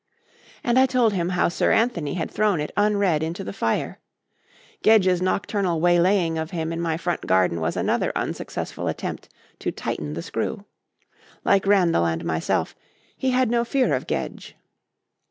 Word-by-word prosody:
And 240 +1 +3
I 265 - +5
told 245 -4 +2
him 175 -2 -1
how 180 -1 +2
Sir 170 - +1
Anthony 185 - +1
had 170 - -3
thrown 210 -5 +1
it 150 - -3
unread 200 -6 +2
into 165 +4 -3
the - - -6
fire. 115 -13 -2 0.8
Gedge's 190 -5 +4
nocturnal 185 -2 0
waylaying 175 0 +3
of 160 0 -3
him 165 -2 -3
in 165 - -3
my 165 -2 -1
front 175 0 -3
garden 90 -3 +2
was 80 +1 -1
another - - 0
unsuccessful - - -4
attempt - - -4 0.3
to - - -2
tighten 75 0 -4
the 85 - -5
screw. 195 - -4 0.8
Like 195 0 +3
Randall 175 - +3
and 80 0 -2
myself, 80 -1 -1 0.4
he 265 - -1
had 255 -2 +2
no 235 0 +2
fear 255 +2 +1
of - - -2
Gedge. - - -4
180 Hz, 160 wpm, -23 LUFS, 160-205 Hz, 0.8 s, I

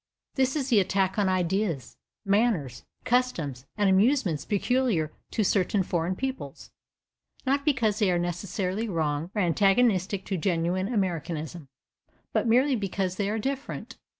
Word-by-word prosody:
This 265 0 +1
is 275 -3 -1
the 230 -5 +5
attack 195 +1 +1
on 200 -2 +2
ideas, 185 - -1 0.3
manners, 195 - +1 0.2
customs 165 - 0
and 205 -1 +3
amusements 195 - +2
peculiar 210 - +1 0.2
to 220 - 0
certain 195 0 +2
foreign 175 +1 -1
peoples, 265 +4 -5 0.7
not 280 +1 +1
because 235 -9 +1
they 205 -4 +3
are 175 - +2
necessarily 185 +4 -2
wrong, 160 -2 -1
or 205 - +2
antagonistic 195 +1 +2
to 190 - -2
genuine 180 +3 0
Americanism, 170 - -2 0.7
but - - +1
merely 255 +4 +4
because 195 -3 -2
they 200 -1 0
are 215 - -1
different. 270 +5 -4
195 Hz, 135 wpm, -27 LUFS, 175-230 Hz, 0.7 s, the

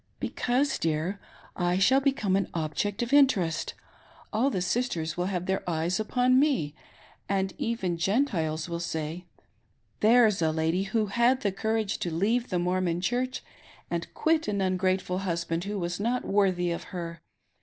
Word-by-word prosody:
" - - -42
Because, 260 +3 0
dear, 165 +5 -1 0.4
I 175 0 +1
shaH 260 +8 +5
become 265 -9 +1
an 195 -1 0
object 170 +7 -1
of 240 +3 -4
interest. 195 - +3 0.6
All 235 +6 +2
the 190 - -1
sisters 180 -5 -1
will 180 +1 -1
have 180 -2 -2
their 190 +1 -1
eyes 170 +4 0
upon 250 +4 +3
me, 265 - +1 0.6
and 195 -1 0
even 225 -10 -1
Gentiles 165 - 0
will 170 -1 -3
say 160 +1 -4 0.4
— - - -43
There's 225 -5 +5
a 160 -1 +2
lady 160 +4 0
who 215 +2 0
had 235 +5 +2
the 200 - +1
Courage 220 +1 -1
to 175 - -2
leave 220 +9 0
the 180 - 0
Mormon 175 -1 0
Church 250 +7 -1 0.5
and 170 0 -3
quit 320 0 +1
an 205 -1 -1
ungrateful 185 -1 0
husband 170 -2 -2
who 205 +1 -3
was 175 -1 -3
not 240 +4 -1
worthy 185 -3 +2
of 170 - -4
her. 170 -2 -6
190 Hz, 165 wpm, -28 LUFS, 170-235 Hz, 0.6 s, shaH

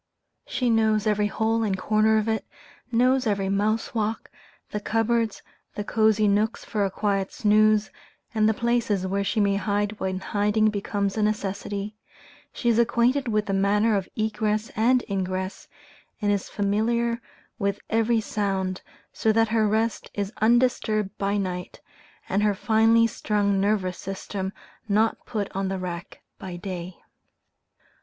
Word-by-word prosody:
She 250 -2 0
knows 220 -1 +2
every 210 -1 +2
hole 220 +2 0
and 200 -4 0
corner 215 +3 +3
of 215 0 0
it, 220 -1 0 0.5
knows 250 +2 +3
every 195 -2 0
mouse 210 +3 0
walk, 220 -1 -2 0.4
the 210 - -2
cupboards, 225 0 0 0.3
the 205 - -3
cosy 215 0 +3
nooks 210 +3 +1
for 210 -2 -1
a 195 - +1
quiet 195 0 -1
snooze, 215 -1 +3 0.4
and 215 -1 +3
the - - +3
places 235 -5 0
where 200 +1 0
she 215 - -1
may 200 -1 +2
hide 205 +1 -1
when 185 0 -2
hiding 210 +2 +1
becomes 200 0 -2
a - - +1
necessity, 205 0 -2 0.5
she 240 - -4
is 235 -1 +4
acquainted 240 +3 +2
with 210 -2 +1
the 195 - -2
manner 205 +3 +3
of 195 -2 -2
egress 215 0 -1
and 245 +3 +3
ingress, 190 -1 -3 0.5
and 205 -2 +1
is 200 -2 -1
familiar 235 +3 0 0.4
with 200 -1 -1
every 225 +1 +2
sound, 190 -3 -2 0.3
so 220 - +2
that 225 0 +3
her 220 -1 +2
rest 220 +2 0
is 200 +1 -3
undisturbed 220 -3 +2
by 200 +1 0
night, 180 -2 -4 0.5
and 200 - +1
her 210 -1 +2
finely 225 +2 +4
strung 205 -3 0
nervous 195 -3 0
system 195 0 -4 0.4
not 220 +2 +1
put 210 -3 -2
on 195 0 -1
the 190 0 -2
rack 180 -1 -6 0.2
by 185 -2 -6
day. 180 -1 -6
210 Hz, 150 wpm, -25 LUFS, 200-220 Hz, 0.5 s, is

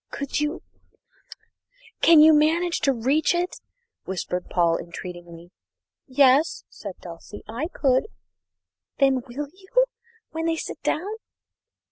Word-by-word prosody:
"Could 280 0 -3
you 300 +4 -2 1.4
can 330 -2 +8
you 315 +1 +8
manage 330 +3 +2
to 275 - +2
reach 270 +7 +1
it?" 355 +1 -2 0.4
whispered 180 -1 -4
Paul 170 -2 +2
entreatingly. 175 0 -9 0.6
"Yes," 270 +2 +3
said 200 -4 -9
Dulcie, 175 +4 -10
"I 240 +8 -3
could." 265 -2 +1 0.9
"Then 270 -2 +3
will 280 +4 -5
you 395 +7 +1 0.5
when 325 +1 -2
they 330 - +1
sit - - -6
down?" 320 - -1
275 Hz, 115 wpm, -24 LUFS, 190-320 Hz, 1.4 s, can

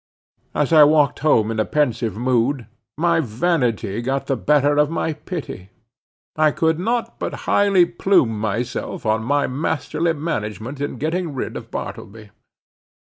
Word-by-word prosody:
As 150 +2 +1
I 155 -2 +9
walked 150 -2 +3
home 115 -7 +3
in 110 - -3
a - - +3
pensive 120 -7 -1
mood, 125 +1 0 0.3
my 170 +1 +2
vanity 120 - 0
got 135 +3 -2
the 135 - 0
better 145 +2 +2
of 150 0 +3
my 160 0 -1
pity. 150 - -7 0.7
I 155 0 +4
could 160 +1 0
not 230 +5 -2
but - - -4
highly 200 -3 +4
plume 170 - +1
myself 115 +4 -3
on 110 0 +1
my 145 +4 +1
masterly 160 +4 -1
management 130 - -4
in 145 -2 -3
getting 160 +2 -2
rid 130 - -4
of - - -7
Bartleby. 105 0 -7
145 Hz, 145 wpm, -21 LUFS, 115-160 Hz, 0.7 s, I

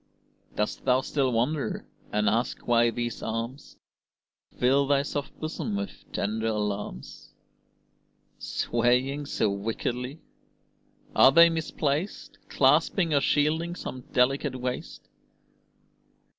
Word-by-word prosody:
Dost 105 - -2
thou 130 0 +3
still 135 -1 0
wonder, 130 +6 -1 0.3
and 105 0 +1
ask 115 +4 0
why 120 0 +4
these 120 0 -4
arms 115 +5 -5 0.8
Fill 135 +3 +3
thy 140 0 +3
soft 145 -1 -5
bosom 165 +7 -3
with 200 -1 -6
tender 110 +2 -1
alarms, 105 - -4 1.0
Swaying 125 +5 0
so 105 - 0
wickedly? 120 +7 -3 1.0
Are 130 - +7
they 170 +3 +7
misplaced 155 +1 -2
Clasping 170 -5 +3
or 140 - +4
shielding 160 +5 +1
some 130 -7 -6
delicate 135 +2 +2
waist? 125 0 -5
130 Hz, 105 wpm, -27 LUFS, 115-145 Hz, 1.0 s, Are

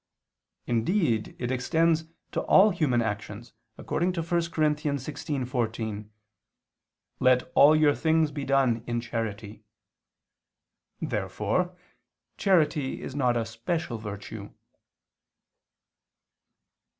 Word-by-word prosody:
indeed 120 - 0
it 120 0 -3
extends 160 +5 +1 0.3
to - - -1
all 205 +3 +6
human 140 -9 +1
actions, 105 +1 -5 0.2
according 175 +2 -1
to 175 -2 -2
1 165 - -14 0.2
Cor. 160 -2 -1
16:14: 130 -7 -2 1.1
"Let 130 0 +3
all 150 +2 +7
your 155 -2 +4
things 160 -1 +2
be 145 -1 -5
done 135 -4 +2
in 120 0 -1
charity." 110 -3 -5 1.4
Therefore 105 - -2 0.6
charity 155 -7 +1
is - - -6
not 125 -4 +1
a 115 - -1
special 115 +3 -3
virtue. 105 0 -7
130 Hz, 95 wpm, -27 LUFS, 115-155 Hz, 1.4 s, all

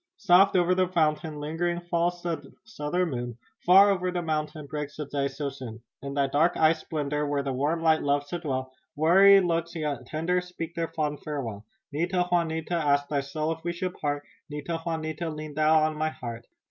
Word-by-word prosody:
"Soft 195 -1 +5
o'er 180 0 +4
the 185 0 +2
fountain, 155 -3 0
ling'ring 170 +4 -1
falls 175 0 -1
the 170 -3 -4
Southern 180 -4 -2
moon 120 -2 -4 0.3
Far 195 +3 +8
o'er 185 -2 0
the 175 -1 -2
mountain, 155 -1 -2
breaks 150 0 -5
the 150 - -3
day 140 0 -1
too 140 +1 -4
soon. 125 -5 -8 0.2
In 140 0 -6
thy 140 -1 +3
dark 145 +5 +2
eyes' 160 0 +4
splendor, 150 -1 -2
where 145 -1 0
the 135 -1 -2
warm 150 +6 0
light 160 -1 +4
loves 145 0 0
to 175 - -3
dwell, 130 -5 -3 0.2
Weary 195 +6 +7
looks, 170 -1 -1
yet 145 -6 -3
tender, 175 +4 0
speak 180 -2 -7
their 165 -1 -2
fond 150 -2 -2
farewell. 115 -9 -5 0.2
Nita! 175 +4 0
Juanita! 165 -1 0
Ask 145 -4 +2
thy 145 -2 +1
soul 155 +3 -2
if 165 0 -5
we 170 0 -2
should 180 +1 -3
part, 145 -3 -2 0.3
Nita! 150 +3 -4
Juanita! 160 0 -3
Lean 155 -1 -6
thou 155 +1 +4
on 155 0 0
my 155 +1 0
heart. 115 -5 -8
155 Hz, 195 wpm, -27 LUFS, 145-175 Hz, 0.3 s, Far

